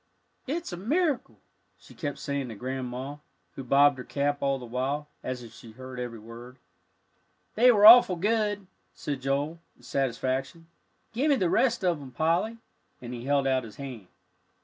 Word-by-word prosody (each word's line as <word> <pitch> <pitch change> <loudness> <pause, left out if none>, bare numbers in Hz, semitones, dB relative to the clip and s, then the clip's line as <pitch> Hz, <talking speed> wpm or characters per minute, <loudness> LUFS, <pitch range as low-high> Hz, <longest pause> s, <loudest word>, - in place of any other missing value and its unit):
"It's 320 - -3
a - - -5
miracle," 290 - -1 0.4
she - - -17
kept 145 -5 -4
saying 140 -3 -3
to 110 - -7
Grandma, 130 +3 -5 0.3
who 135 - -8
bobbed 140 +2 +4
her - - -5
cap 145 +1 -1
all 140 -1 +1
the 125 - -9
while, 135 +5 -3
as 125 -1 -5
if 115 -1 -12
she 115 -1 -13
heard 130 +1 -9
every 120 -2 -5
word. 115 +3 -12 1.0
"They 245 +3 +6
were 210 -3 +4
awful 225 -4 +10
good," 205 +1 0 0.3
said 140 -3 -4
Joel, 140 +5 -1 0.2
in - - -23
satisfaction. 135 +4 -2 0.5
"Give 270 +7 +1
me 285 - +5
the 185 -9 0
rest 235 -7 +2
of 170 -5 +1
'em, 135 - -9
Polly," 165 - 0 0.4
and 120 0 -8
he 120 0 -7
held 140 0 +2
out 130 -1 +1
his 110 -2 -11
hand. 130 -9 -8
140 Hz, 170 wpm, -27 LUFS, 125-180 Hz, 1.0 s, awful